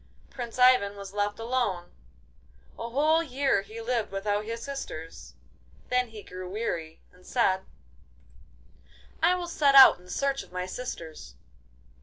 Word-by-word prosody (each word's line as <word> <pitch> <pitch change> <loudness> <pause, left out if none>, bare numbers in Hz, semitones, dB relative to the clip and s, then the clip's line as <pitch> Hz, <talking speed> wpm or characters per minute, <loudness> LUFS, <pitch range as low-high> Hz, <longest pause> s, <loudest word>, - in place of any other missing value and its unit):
Prince 240 -2 -7
Ivan 250 -6 +5
was 200 -1 -9
left 205 0 -1
alone. 225 -7 -2 0.9
A 235 - -4
whole 305 +6 +3
year 270 -7 +1
he 215 +3 -10
lived 230 -2 -2
without 205 +1 -1
his 230 +1 -5
sisters; 165 - -7 0.5
then 250 0 +2
he 220 -2 -11
grew 185 0 -8
weary, 170 -6 -4
and 180 0 -21
said: 190 -6 +1 1.6
'I 345 +3 +4
will 355 -1 -4
set 290 -4 +2
out 265 -8 +10
in 180 0 -18
search 275 +6 -1
of - - -15
my 180 0 -3
sisters. 165 - -7
225 Hz, 140 wpm, -27 LUFS, 190-255 Hz, 1.6 s, out